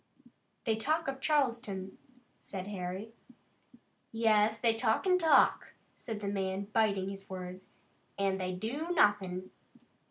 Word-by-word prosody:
"They 220 Hz, -2 st, +1 dB
talk 310 Hz, +8 st, 0 dB
of 270 Hz, 0 st, -3 dB
Charleston," 235 Hz, -11 st, 0 dB, 0.4 s
said 190 Hz, -2 st, -6 dB
Harry. 195 Hz, +2 st, -5 dB, 1.0 s
"Yes, 220 Hz, -1 st, +3 dB
they 230 Hz, -2 st, +3 dB
talk 225 Hz, -, +1 dB
an' 365 Hz, -1 st, +4 dB
talk," 325 Hz, -2 st, +4 dB, 0.2 s
said 220 Hz, -3 st, -6 dB
the 200 Hz, -, -3 dB
man, 195 Hz, 0 st, -2 dB
biting 200 Hz, -4 st, +2 dB
his 195 Hz, 0 st, -8 dB
words, 185 Hz, 0 st, -7 dB, 0.5 s
"an' 195 Hz, -1 st, 0 dB
they 185 Hz, 0 st, -2 dB
do 260 Hz, -, -4 dB
nothin'." 185 Hz, -, +2 dB
210 Hz, 125 wpm, -32 LUFS, 190-230 Hz, 1.0 s, an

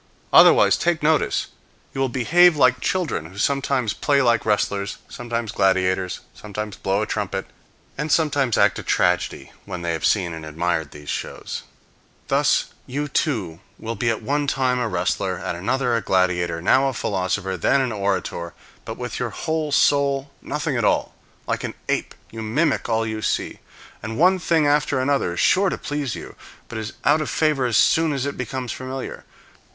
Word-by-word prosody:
Otherwise, -, -, +7 dB
take 170 Hz, -3 st, 0 dB
notice, 155 Hz, 0 st, +2 dB, 0.5 s
you 135 Hz, -, -3 dB
will 135 Hz, -, +1 dB
behave 165 Hz, +8 st, +4 dB
like 130 Hz, -2 st, +4 dB
children 175 Hz, -, -1 dB
who 95 Hz, +4 st, -14 dB
sometimes 130 Hz, -2 st, 0 dB
play 140 Hz, -2 st, +1 dB
like 120 Hz, -4 st, +2 dB
wrestlers, 100 Hz, -2 st, 0 dB
sometimes 115 Hz, -2 st, -4 dB
gladiators, 95 Hz, -1 st, +1 dB
sometimes 105 Hz, 0 st, -6 dB
blow 100 Hz, +2 st, 0 dB
a -, -, -1 dB
trumpet, -, -, -3 dB, 0.5 s
and 150 Hz, +1 st, -2 dB
sometimes 140 Hz, -7 st, +2 dB
act -, -, +3 dB
a -, -, -4 dB
tragedy -, -, 0 dB
when 90 Hz, -3 st, -6 dB
they 85 Hz, -, -1 dB
have 80 Hz, -, -4 dB
seen 90 Hz, -5 st, +2 dB
and 80 Hz, -1 st, -7 dB
admired 80 Hz, 0 st, -2 dB
these 75 Hz, 0 st, -13 dB
shows. -, -, -5 dB, 0.7 s
Thus -, -, +2 dB
you 145 Hz, +3 st, -3 dB
too 110 Hz, -, -1 dB, 0.2 s
will 115 Hz, +1 st, -5 dB
be 115 Hz, +2 st, -1 dB
at 115 Hz, 0 st, -2 dB
one 145 Hz, +4 st, 0 dB
time 130 Hz, -2 st, +1 dB
a 120 Hz, -, 0 dB
wrestler, 95 Hz, -3 st, -1 dB
at -, -, -4 dB
another 120 Hz, +8 st, 0 dB
a 115 Hz, -, 0 dB
gladiator, 90 Hz, -3 st, 0 dB
now 135 Hz, +8 st, +4 dB
a 135 Hz, -, -1 dB
philosopher, 95 Hz, -2 st, -1 dB
then 115 Hz, +10 st, +2 dB
an 130 Hz, -3 st, 0 dB
orator; 95 Hz, -4 st, -2 dB, 0.3 s
but -, -, -6 dB
with -, -, -5 dB
your -, -, -1 dB
whole 160 Hz, -1 st, -2 dB
soul, 140 Hz, -1 st, +2 dB
nothing 150 Hz, -1 st, -2 dB
at 120 Hz, -, 0 dB
all. -, -, +1 dB, 0.3 s
Like -, -, -2 dB
an -, -, -4 dB
ape, -, -, -1 dB, 0.2 s
you 115 Hz, -, -7 dB
mimic 130 Hz, +6 st, 0 dB
all 115 Hz, 0 st, +1 dB
you 110 Hz, -1 st, -4 dB
see, -, -, -2 dB, 0.4 s
and 110 Hz, +1 st, -5 dB
one 185 Hz, +3 st, +4 dB
thing 165 Hz, -3 st, +2 dB
after 145 Hz, -2 st, +2 dB
another 130 Hz, -10 st, 0 dB
is -, -, -4 dB
sure 195 Hz, +1 st, +4 dB
to -, -, -3 dB
please 145 Hz, -4 st, -3 dB
you, -, -, -9 dB, 0.4 s
but 115 Hz, -, -5 dB
is 110 Hz, 0 st, -5 dB
out 145 Hz, +4 st, +4 dB
of 155 Hz, -, -3 dB
favor 150 Hz, -5 st, +1 dB
as 115 Hz, -, +2 dB
soon 160 Hz, -2 st, +3 dB
as 135 Hz, -1 st, -2 dB
it 140 Hz, -, -3 dB
becomes 130 Hz, -1 st, -4 dB
familiar. 130 Hz, +1 st, -6 dB
120 Hz, 180 wpm, -22 LUFS, 100-140 Hz, 0.7 s, Otherwise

